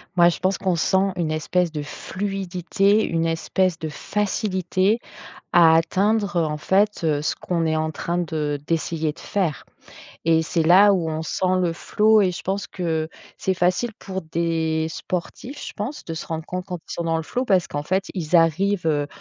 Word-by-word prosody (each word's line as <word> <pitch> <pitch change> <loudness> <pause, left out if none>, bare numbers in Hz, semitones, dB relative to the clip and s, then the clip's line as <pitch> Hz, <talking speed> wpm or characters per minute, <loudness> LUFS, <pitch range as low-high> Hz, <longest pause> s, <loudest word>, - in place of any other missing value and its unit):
Moi 175 -1 +6
je 175 - -3
pense 190 +1 +1
qu'on 185 -2 0
sent 190 +3 +2
une 165 -3 -1
espèce 170 +3 0
de 150 -2 -4
fluidité, 195 +4 0
une 165 0 0
espèce 165 +2 0
de 160 - -4
facilité 195 +2 0 0.5
à 165 -2 +7
atteindre 200 +4 +1
en 150 -1 -2
fait, 200 +6 +1
heu, 150 -2 +1
ce - - 0
qu'on 170 -2 -2
est 160 0 +1
en 155 0 0
train 170 +3 -3
de 155 -4 -2
d'essayer 160 -2 -1
de - - -21
faire. 180 -8 -2 0.6
Et 160 0 +4
c'est 165 +1 0
là 190 +5 +7
où 170 -4 0
on 160 0 -3
sent 185 +3 0
le 175 -2 +1
flow 215 +5 +3
et 185 -2 +2
je 175 - -7
pense 195 +2 -2
que, 160 -3 -2 0.3
c'est 190 - 0
facile 180 +7 +1
pour 190 -1 -5
des 160 -1 -1
sportifs, 185 - -5
je - - -7
pense, 235 +9 -5
de 165 - -4
se 160 - -6
rendre 160 -1 -4
compte 180 +1 -5
quand 180 -2 -4
ils - - -6
sont 170 - -3
dans 165 -1 0
le 160 - -3
flow 250 +9 -2
parce 190 -5 +2
qu'en 145 - -3
fait 185 +6 0
ils 175 -2 -1
arrivent, 170 +3 +3
heu, 145 -2 +1
175 Hz, 195 wpm, -23 LUFS, 160-190 Hz, 0.6 s, à